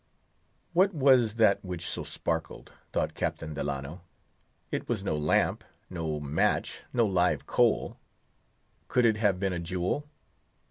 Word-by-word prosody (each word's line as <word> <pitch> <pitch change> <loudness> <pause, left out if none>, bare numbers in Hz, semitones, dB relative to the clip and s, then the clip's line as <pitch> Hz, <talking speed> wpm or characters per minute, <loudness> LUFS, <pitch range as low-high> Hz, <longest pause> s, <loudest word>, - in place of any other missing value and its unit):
What 190 +2 +3
was 130 -6 +4
that 110 -3 +4
which 90 -3 -5
so - - -3
sparkled? 80 -2 -4 0.2
thought - - -1
Captain 80 -1 -3
Delano. 70 +3 -4 0.7
It - - -3
was 110 -5 -1
no 90 - -1
lamp—no 75 +1 -1
match—no 80 - 0
live 90 -3 +1
coal. - - +1 0.9
Could 125 -1 +2
it 110 -2 +4
have 100 -4 +2
been 95 -1 0
a 85 - -2
jewel? 90 - -2
90 Hz, 125 wpm, -29 LUFS, 80-115 Hz, 0.9 s, was